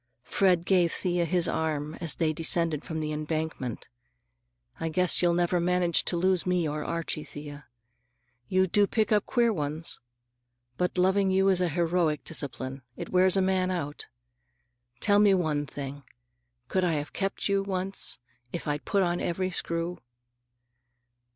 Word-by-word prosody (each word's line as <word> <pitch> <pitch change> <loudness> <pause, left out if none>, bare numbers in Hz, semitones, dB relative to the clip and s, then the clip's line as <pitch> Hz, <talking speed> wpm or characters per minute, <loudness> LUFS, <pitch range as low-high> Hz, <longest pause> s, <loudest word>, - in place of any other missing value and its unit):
Fred 180 0 +2
gave 175 -3 +3
Thea 175 -1 0
his 175 0 +2
arm 155 -1 -1
as 165 -3 -2
they 160 -2 +1
descended 165 -1 +1
from 160 -1 -4
the 155 0 -2
embankment. 155 -5 -3 0.9
"I 165 - -2
guess 180 +3 +3
you'll 175 -1 +3
never 175 0 +2
manage 175 0 +2
to 175 - 0
lose 185 0 +2
me 180 -3 +1
or 150 0 -3
Archie, 165 -2 -3
Thea. 145 -1 -10 0.8
You 185 0 +3
do 200 +3 +3
pick 220 0 0
up 210 -1 +2
queer 235 -2 +2
ones. 155 -1 -4 0.8
But 180 +6 -1
loving 190 +2 +3
you 190 +1 +3
is 185 -2 +3
a 180 - +2
heroic 165 -1 +1
discipline. 135 -3 -3 0.2
It - - -6
wears 185 +1 +4
a 190 - +3
man 185 -1 +1
out. 150 -5 -4 0.9
Tell 205 -1 +4
me 205 -2 +5
one 150 -5 0
thing: 140 0 -6 0.7
could 185 +8 0
I 175 -2 +2
have 145 -1 -3
kept 195 0 -2
you, 200 -1 +2
once, 195 0 -2 0.3
if 170 - -5
I'd 145 0 -2
put 200 -2 +2
on 175 -1 0
every 185 +2 -1
screw?" 170 0 -2
175 Hz, 155 wpm, -28 LUFS, 155-185 Hz, 0.9 s, me